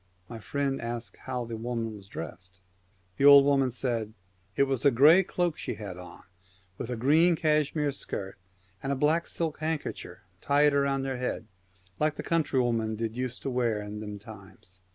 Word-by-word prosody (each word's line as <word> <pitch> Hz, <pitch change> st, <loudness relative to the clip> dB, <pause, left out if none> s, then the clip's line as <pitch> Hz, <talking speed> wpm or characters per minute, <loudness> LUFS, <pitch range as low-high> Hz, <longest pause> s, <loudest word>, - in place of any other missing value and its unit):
' 90 Hz, 0 st, -37 dB
My 115 Hz, -, -6 dB
friend 140 Hz, +4 st, -2 dB
asked 120 Hz, 0 st, -5 dB
how 125 Hz, -2 st, -3 dB
the 115 Hz, 0 st, -6 dB
woman 115 Hz, -1 st, -3 dB
was 100 Hz, -2 st, -13 dB
dressed, 90 Hz, 0 st, -8 dB
and 90 Hz, 0 st, -39 dB
the 140 Hz, -, +7 dB
old 140 Hz, -1 st, +9 dB
woman 135 Hz, -2 st, +3 dB
said, 115 Hz, -3 st, -2 dB, 0.2 s
' 95 Hz, +2 st, -39 dB
It -, -, +5 dB
was 135 Hz, -3 st, -1 dB
a 140 Hz, -, +7 dB
gray 145 Hz, +9 st, +7 dB
cloak 175 Hz, -3 st, -1 dB
she -, -, -4 dB
had 100 Hz, -3 st, -7 dB
on, 90 Hz, 0 st, -11 dB, 0.6 s
with 115 Hz, -, -4 dB
a 125 Hz, -, -2 dB
green 155 Hz, +9 st, +4 dB
cashmere 150 Hz, -2 st, +1 dB
skirt 95 Hz, -7 st, -6 dB, 0.4 s
and 135 Hz, -, -2 dB
a -, -, +1 dB
black 155 Hz, +5 st, +1 dB
silk 160 Hz, -3 st, -3 dB
hand 155 Hz, 0 st, -1 dB
kercher -, -, -7 dB, 0.2 s
tied 145 Hz, +1 st, +3 dB
round 140 Hz, -1 st, +1 dB
her 135 Hz, -1 st, -2 dB
head, 125 Hz, -2 st, -3 dB, 0.5 s
like 155 Hz, 0 st, +1 dB
the -, -, -6 dB
country 155 Hz, -5 st, +1 dB
women 115 Hz, -3 st, 0 dB
did 115 Hz, 0 st, -3 dB
use 125 Hz, -1 st, -3 dB
to 135 Hz, -, -3 dB
wear 120 Hz, -4 st, 0 dB
in 105 Hz, 0 st, -6 dB
them 105 Hz, -1 st, -6 dB
times.' 100 Hz, -3 st, -12 dB
125 Hz, 195 wpm, -28 LUFS, 105-140 Hz, 0.6 s, old